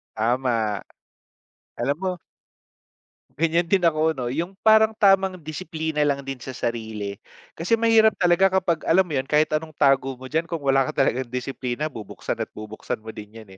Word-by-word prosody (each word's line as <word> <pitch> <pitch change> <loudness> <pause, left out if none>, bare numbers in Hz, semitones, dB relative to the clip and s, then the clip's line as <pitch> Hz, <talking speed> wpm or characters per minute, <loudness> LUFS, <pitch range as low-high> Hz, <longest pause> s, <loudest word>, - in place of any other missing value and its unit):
Tama, 115 -2 0 1.0
alam 140 +4 0
mo 185 -2 -3 1.2
Ganiyan 165 +1 +2
din 190 -1 +2
ako 160 -1 +3
'no, 125 -2 -3
yung 170 +6 -4
parang 220 0 +6
tamang 195 -2 +4
disiplina 160 -1 -4
lang 140 -1 0
din 135 -1 -5
sa 130 - -6
sarili 110 -5 -4 0.4
kasi 225 +8 +1
mahirap 225 -1 +5
talaga 185 +2 +4
kapag 170 -3 -1
alam 190 +3 +4
mo 160 - -6
yun, 135 0 -1
kahit 155 +1 +4
anong 155 +1 -3
tago 135 -2 +2
mo 130 - -10
diyan 160 +4 -1
kung 165 - -3
wala 135 -1 +3
ka - - -1
talagang 130 -1 -1
disiplina 125 +2 -3
bubuksan 115 -8 -6
at - - -4
bubuksan 110 0 -6
mo 110 +1 -9
din 105 0 -11
‘yan, 110 - -17
150 Hz, 170 wpm, -23 LUFS, 125-175 Hz, 1.2 s, parang